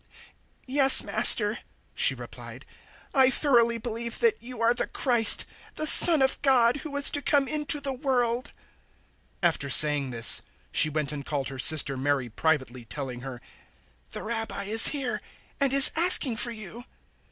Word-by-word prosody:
011:027 - - -33 0.6
"Yes, 270 0 +6
Master," 210 0 +2 0.3
she - - 0
replied; - - -14 0.5
"I 265 -2 +3
thoroughly 240 -4 0
believe 230 0 -8
that 465 -2 -2
you 245 0 -11
are 230 +1 0
the 245 - -5
Christ, 240 -4 -1 0.3
the 310 - -3
Son 315 -2 +6
of 265 - -3
God, 250 -3 +1
who 305 - -10
was 285 -1 +4
to 290 - -3
come 280 0 -1
into 300 0 -3
the 275 -1 -6
world." 250 -1 -4 0.9
011:028 - - +4
After 140 -4 -5
saying 145 -1 +1
this, 115 -2 +4 0.3
she 155 - +3
went 150 -1 -5
and 145 -2 -8
called 140 -2 -6
her 135 -1 -11
sister 140 -1 +2
Mary 135 -2 -4
privately, 130 -2 -4
telling 125 0 -9
her, 125 -1 -11 0.7
"The - - -10
Rabbi 225 -2 -7
is 220 +3 +6
here 275 -4 -4 0.4
and 275 -2 -1
is 275 0 +5
asking 320 -8 0
for 240 - 0
you." 225 +1 -12
235 Hz, 165 wpm, -24 LUFS, -, 0.9 s, Yes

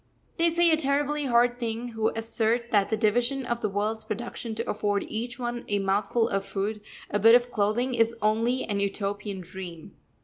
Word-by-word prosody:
They 335 0 +4
say 340 0 +4
a 315 - +4
terribly 290 0 0
hard 240 0 +3
thing 230 0 -3
who 225 -1 -1
assert 230 +1 0
that 200 -2 +3
the 220 - 0
division 240 +5 +1
of 235 -1 -2
the 210 - 0
world's 215 +3 -2
production 225 +1 -5
to 230 +2 -3
afford 205 -1 0
each 235 +2 -4
one 240 -1 -4
a 205 - +1
mouthful 200 +4 +1
of 195 -3 -1
food, 205 +2 -3 0.3
a 205 - +1
bit 225 +3 +7
of 245 0 +2
clothing, 230 +4 0
is 230 -1 +2
only 230 +4 +1
an 205 -2 -2
Utopian 200 0 -3
dream. 175 -2 -9
225 Hz, 190 wpm, -27 LUFS, 205-245 Hz, 0.3 s, bit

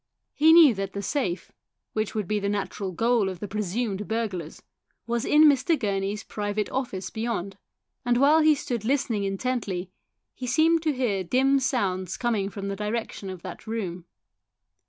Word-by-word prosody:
He 315 +2 +5
knew 325 -6 +8
that 195 -1 -4
the 200 - -4
safe, 195 - -2 0.4
which 215 0 -2
would 210 -4 -2
be 210 -1 0
the 200 0 -1
natural 200 -1 -3
goal 225 +2 +2
of 185 -2 -7
the 205 - -5
presumed 210 0 -2
burglars, 205 -8 -3 0.4
was 235 +1 -1
in 300 +1 +5
Mr. 290 +2 +4
Gurney's 200 -2 -2
private 205 0 -3
office 200 -8 -3
beyond, 220 -4 -3 0.5
and 245 -1 +2
while 290 +5 +5
he 310 -1 +5
stood 245 -6 -4
listening 230 -5 0
intently 195 -3 -2 0.4
he 250 - -6
seemed 325 +5 +3
to 310 -2 +1
hear 230 -8 0
dim 270 +8 +3
sounds 190 -9 -1
coming 220 -5 0
from 200 -1 -6
the 200 - -2
direction 210 -1 -4
of 185 -2 -8
that 185 +4 -9
room. 185 -6 -4
215 Hz, 165 wpm, -26 LUFS, 195-255 Hz, 0.5 s, knew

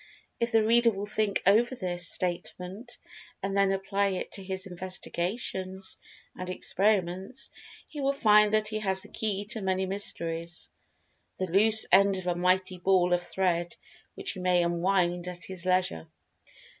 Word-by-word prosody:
If 235 0 0
the 225 -2 +4
reader 235 +2 +4
will 200 -2 -4
think 210 -1 -1
over 230 +6 +4
this 175 -5 -3
statement, 185 +6 -4 0.5
and 195 0 -2
then 195 -1 +3
apply 195 +1 0
it 190 -2 -3
to 195 - -7
his 190 +1 -4
investigations 185 +1 -4 0.4
and 185 0 -6
experiments, 190 +3 -1 0.4
he 295 - -7
will 275 0 +2
find 210 -6 +5
that 215 0 +1
he 215 0 -2
has 190 -2 -2
the - - -14
key 205 -2 -3
to 220 - -3
many 190 0 0
mysteries—the 165 - -6
loose 220 +4 +5
end 195 +1 +5
of 185 - -5
a 180 - +1
mighty 185 +1 +1
ball 180 -1 +3
of 175 - +2
thread, 175 -1 -1 0.4
which 395 -1 -3
he 190 - -8
may 180 -1 +3
unwind 175 0 +1
at 180 0 -7
his 185 -1 -6
leisure. 185 - +1
190 Hz, 155 wpm, -28 LUFS, 180-210 Hz, 0.5 s, find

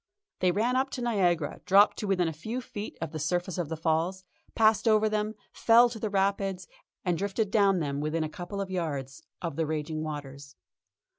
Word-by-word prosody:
They 180 -1 +3
ran 225 +7 +1
up 265 +1 +1
to - - -4
Niagara, 180 -9 +1
dropped 200 +2 +6
to 210 - -3
within 180 -3 +2
a 160 - -2
few 220 +11 -4
feet 215 -4 -7
of 165 -2 -4
the 155 - -5
surface 175 +4 -1
of 165 -4 -2
the 160 - -3
Falls, 165 +4 0 0.3
passed 220 0 +4
over 215 -1 +4
them, 215 0 -1 0.2
fell 235 +1 +5
to 230 -1 -7
the 215 - -2
Rapids, 195 -2 0 0.4
and 175 -2 0
drifted 200 +1 -1
down 200 -3 +4
them 140 -1 -2
within 155 +2 -1
a - - -1
couple 180 +5 -7
of 190 -1 -5
yards 140 -7 -3 0.2
of 165 -4 -3
the 160 -2 0
raging 155 0 -3
waters. 140 -2 -7
185 Hz, 200 wpm, -28 LUFS, 160-210 Hz, 0.4 s, dropped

